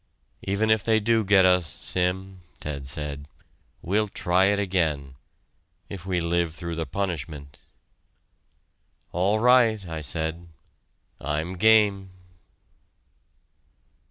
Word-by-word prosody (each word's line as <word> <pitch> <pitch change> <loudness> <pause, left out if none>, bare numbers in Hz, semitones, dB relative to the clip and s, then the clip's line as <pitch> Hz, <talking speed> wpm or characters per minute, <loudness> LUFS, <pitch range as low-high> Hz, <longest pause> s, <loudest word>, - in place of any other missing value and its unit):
"Even 105 +3 0
if 110 -2 +2
they 110 -1 +3
do 115 +1 +2
get 95 -1 +5
us, 90 -2 +3
Sim," 95 +3 -2 0.2
Ted 70 -3 -5
said, 70 +1 -5 0.6
"we'll 105 +4 +1
try 95 -1 +1
it 100 +1 +2
again 80 -9 -1 0.8
if 95 -2 -8
we 90 -2 0
live 85 -1 0
through 85 -1 -5
the 80 -1 -3
punishment." 80 -7 -5 1.5
"All 95 +5 +1
right," 115 -3 +4
I 80 -1 -5
said, 80 +3 -4 0.7
"I'm 80 +5 -3
game." 105 -1 +3
90 Hz, 105 wpm, -25 LUFS, 80-100 Hz, 1.5 s, get